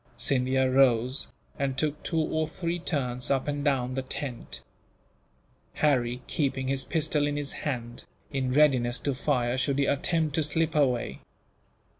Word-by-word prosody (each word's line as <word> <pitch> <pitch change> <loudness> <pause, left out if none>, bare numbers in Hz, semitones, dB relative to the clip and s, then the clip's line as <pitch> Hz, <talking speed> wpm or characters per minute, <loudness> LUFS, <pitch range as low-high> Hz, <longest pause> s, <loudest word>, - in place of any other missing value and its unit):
Scindia 130 0 +2
rose, 130 0 +3 0.3
and 135 -1 -1
took 150 0 -1
two 165 - -3
or 155 0 0
three 170 +2 -3
turns 125 -7 -1
up 135 0 +1
and 145 -1 -2
down 130 -4 +1
the 135 - -1
tent; 130 -1 -5 1.1
Harry 125 -4 +1
keeping 135 -3 -1
his 135 0 0
pistol 150 -1 +1
in 145 0 -2
his 145 -1 -2 0.2
hand, 120 -3 -5 0.3
in 135 -2 -1
readiness 130 -4 +3
to 140 - 0
fire 125 -2 0
should 140 +1 0
he 140 - +3
attempt 155 +2 +1
to 160 - +1
slip 160 +2 +1
away. 125 - +1
135 Hz, 150 wpm, -28 LUFS, 125-150 Hz, 1.1 s, rose